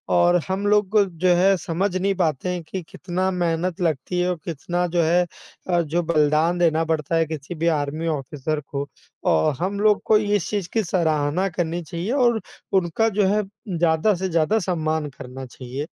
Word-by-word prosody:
और 175 0 +4
हम 190 +2 -2
लोग 210 0 +3 0.2
जो 180 0 +4
है 195 +2 +4
समझ 180 +3 -2
नहीं 195 +2 +1
पाते 170 -2 0
हैं 180 -1 -2
कि 185 +4 -5
कितना 185 +1 -2
मेहनत 175 0 -1
लगती 165 +1 -1
है 180 - +1
और 180 - -1
कितना 175 +2 -2
जो 175 0 +1
है 175 +2 +3 0.4
अ, 175 -1 +3
जो 170 +2 -1
बलिदान 155 +1 +2
देना 165 -2 +3
पड़ता 160 0 -1
है 165 0 +3
किसी 155 +2 -6
भी 165 +1 -1
आर्मी 150 +3 -3
ऑफिसर 150 0 -2
को। 140 -1 -4 0.4
औ 80 -1 +3
हम 195 +3 -2
लोग 210 -1 +3
को 215 - +5
इस 205 -3 0
चीज़ 200 -5 -2
की 225 - +2
सराहना 160 -1 +1
करनी 170 0 -2
चाहिए 170 +7 -4
और 240 -5 +3 0.3
उनका 190 +4 +2
जो 205 -2 +2
है, 210 +2 +2 0.3
ज़्यादा 165 +4 +3
से 190 +1 -2
ज़्यादा 170 +6 +2
सम्मान 160 -5 -1
करना 130 +1 -7
चाहिए। 130 +3 -6
175 Hz, 185 wpm, -23 LUFS, 155-190 Hz, 0.4 s, को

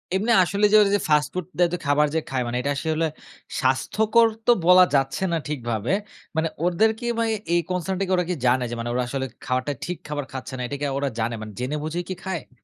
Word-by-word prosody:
এমনি 215 +5 +1
আসলে 200 +4 +1
যে - - +6
ওরা 200 - +4
যে - - +2
ফাস্ট 150 -1 +3
ফুড 185 -2 -3
দেয় 175 -1 +4
তো - - 0
খাবার 145 +1 +3
যে - - +3
খায়, 130 -2 -1
মানে 120 +1 -2
এটা 140 - -1
আসলে 160 +2 0 0.5
স্বাস্থ্যকর 220 - +3 0.2
তো 240 - +6
বলা 180 0 +8
যাচ্ছে 135 +7 +1
না 165 - +1
ঠিকভাবে। 120 - -2 0.4
মানে 160 +1 +1 0.2
ওদের 200 +6 +3
কি 240 - -6
ভাই, 230 -1 +1 0.2
এই 175 - +4
কনসার্ন 180 +1 -2
টা - - +1
কি - - -3
ওরা 180 - +1
কি 180 - 0
জানে 125 +1 +3
যে, 120 - -5 0.2
ওরা 125 0 +1
আসলে 135 +1 -2 0.2
খাবারটা 130 +3 -1
ঠিক 180 -1 -4
খাবার 145 -2 -3
খাচ্ছে 130 0 -7
না? - - -4
এটা 140 - -4
কি - - 0
ওরা 140 0 0
জানে, 115 +1 0
মানে 110 -1 -7
জেনে 130 +4 -2
বুঝেই 170 +3 -3
কি 185 - -2
খায়? 180 -8 -4
155 Hz, 235 wpm, -24 LUFS, 130-185 Hz, 0.5 s, বলা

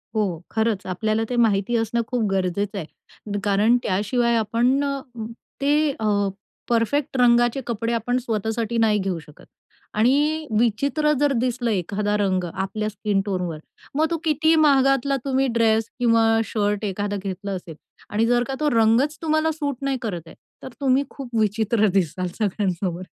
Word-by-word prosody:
हो, 185 -6 -1
खरंच. 220 -3 0
आपल्याला 215 +4 0
ते 250 - -2
माहिती 225 -1 +2
असणं 225 +1 0
खूप 245 -3 -1
गरजेचं 195 +2 -1
आहे 200 +4 -8
कारण 210 +4 +3
त्याशिवाय 235 +5 +1
आपण 235 +5 +2
अ, 275 -1 -1 0.6
ते 295 +1 +3
अ, 205 -2 +1 0.4
परफेक्ट 255 +4 0
रंगाचे 240 +1 +4
कपडे 230 0 -2
आपण 245 +2 0
स्वतःसाठी 225 0 -2
नाही 220 -2 +3
घेऊ 190 -3 -2
शकत 150 -1 -16 0.5
आणि 295 +7 +2
विचित्र 280 +7 +1
जर 290 -1 +3
दिसलं 245 -1 -1
एखादा 205 +2 -1
रंग 190 -3 +1
आपल्या 195 +3 -2
स्किन 205 -1 -1
टोनवर 180 -6 -3 0.4
मग 310 +2 +3
तो 335 - +1
कितीही 315 +1 +3
महागातला 275 -1 +3
तुम्ही 270 0 +1
ड्रेस 225 -1 +2
किंवा 230 -2 +4 0.2
शर्ट 205 -1 -1
एखादा 205 +1 -2
घेतला 195 +1 -4
असेल 175 -4 -6 0.3
आणि 215 +2 +1
जर 240 +1 +2
का 270 - -3
तो 300 -1 +2
रंगच 230 +6 +3
तुम्हाला 315 0 +1
सूट 290 -3 -3
नाही 275 -1 -1
करत 195 -7 -3
आहे, - - -13 0.3
तर 260 - -6
तुम्ही 270 +1 +3
खूप 270 -3 -9
विचित्र 215 +1 +2
दिसाल 185 -1 0
सगळ्यांसमोर. 185 -3 -1
225 Hz, 155 wpm, -23 LUFS, 200-260 Hz, 0.6 s, रंगाचे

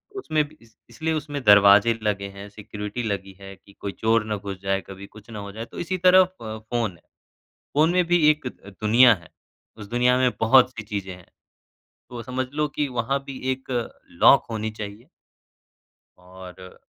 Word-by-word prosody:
उसमें 155 - 0
भी 155 +1 -20
इस 115 -1 -22
इसलिए 160 0 -3
उसमे 145 -2 -4
दरवाजे 105 0 +6
लगे 100 -2 -1
हैं, 100 +1 -10
सिक्योरिटी 105 +2 -7
लगी 100 -3 -4
है 95 0 -11
कि 100 +1 -21
कोई 100 - -6
चोर 110 +2 +1
ना 105 0 -2
घुस 100 -1 -7
जाए, 95 0 -1
कभी 95 +1 -10
कुछ 105 +2 -17
ना 110 -2 -7
हो 100 0 -7
जाए, 110 +3 -7
तो - - -11
इसी 185 +2 -2
तरह 185 +1 +6 0.2
फ़ 110 -1 -6
फ़ोन 115 -1 -2
है, 85 - -20 0.7
फ़ोन 155 +3 +4
में 180 0 +3
भी 175 -2 +3
एक 150 -3 -1
द 100 -5 -9
दुनिया 115 +3 +6
है, 85 -4 -15 0.5
उस 105 -2 -10
दुनिया 125 +1 +3
में 130 -1 +3
बहुत-सी 125 0 +4
चीज़ें 100 -3 -5
हैं। 90 -1 -16 0.8
तो 120 -1 -7
समझ 130 +2 -3
लो 150 0 +1
कि 145 +1 -2
वहाँ 125 +2 -1
भी 135 -2 -7
एक 130 0 -5 0.5
लॉक - - +7
होनी 110 -1 -3
चाहिए। 110 +3 -9 1.1
और 90 0 -13
110 Hz, 185 wpm, -24 LUFS, 100-130 Hz, 1.1 s, लॉक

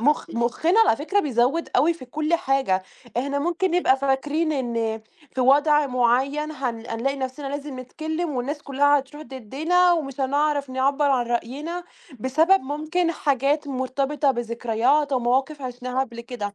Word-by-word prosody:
مخ 295 +6 +1
مخّنا 250 - +2
على 410 - +4
فكرة 390 +8 0
بيزوّد 270 +4 +1
أوي 335 +3 +4
في 320 - -11
كلّ 310 +6 -1
حاجة، 265 - +1 0.3
إحنا 280 +3 -1
ممكن 345 +4 0
نبقى 345 -7 +3
فاكرين 290 +4 0
إن 230 -5 -2 0.3
في 260 - -1
وضع 290 +3 +4
معيّن 265 +4 +1
هن 245 -6 -4
هنلاقي 255 +4 -2
نفْسنا 265 +1 -5
لازم 285 -2 -5
نتكلّم 315 +6 -4
والناس 285 +4 -3
كلّها 285 +1 +3
هتروح 285 +3 -9
ضدّنا، 310 +8 +1
ومش 275 -5 -2
هنعرف 285 0 0
نعبّر 275 +2 +1
عن 245 -3 +1
رأينا، 290 +9 -3 0.4
بسبب 320 - +3
ممكن 310 +5 -1
حاجات 285 +1 0
مرتبطة 275 +2 0
بذكريات 240 +4 0
أو 260 - +3
مواقف 265 +4 0
عشناها 250 0 -3
قبل 235 -3 -4
كده، 230 -5 -6
275 Hz, 150 wpm, -23 LUFS, 250-300 Hz, 0.4 s, على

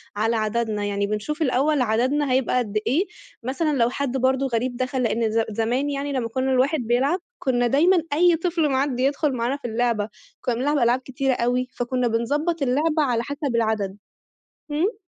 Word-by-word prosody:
على 225 +3 +1
عددنا، 215 -1 -1
يعني 200 0 -1
بنشوف 215 +10 -3
الأول 285 +1 +2
عددنا 255 +5 +1
هيبقى 255 0 +2
قد 215 -4 -1
إيه؟ 310 - +2 0.4
مثلًا 280 +4 0
لو 235 -1 +3
حد 270 0 -2
برضه 265 +1 +1
غريب 245 0 -1
دخل، 255 0 -1
لإن 230 -1 0
ز 225 - +1
زمان 235 +6 0
يعني 285 0 -3
لمّا 250 -4 -1
كُنّا 260 +3 -1
الواحد 265 +4 +2
بيلعب، 255 +8 +1 0.2
كُنّا 245 -2 +1
دايمًا 330 +6 +4
أي 345 +2 +5
طفل 335 -2 0
معدّي 265 -1 0
يدخل 285 +1 +1
معانا 245 +3 -1
في 280 - -6
اللعبة، 225 -2 0 0.3
كُنّا 245 - -1
بنلعب 290 +5 0
ألعاب 240 -1 +3
كتيرة 265 +1 -1
أوي، 245 +1 0
فكُنّا 245 0 0
بنضبّط 290 +9 0
اللعبة 300 +4 +2
على 240 -4 0
حسب 285 -2 -3
العدد. 215 -4 0 0.7
إمم. 365 +9 0
255 Hz, 175 wpm, -23 LUFS, 235-285 Hz, 0.7 s, أي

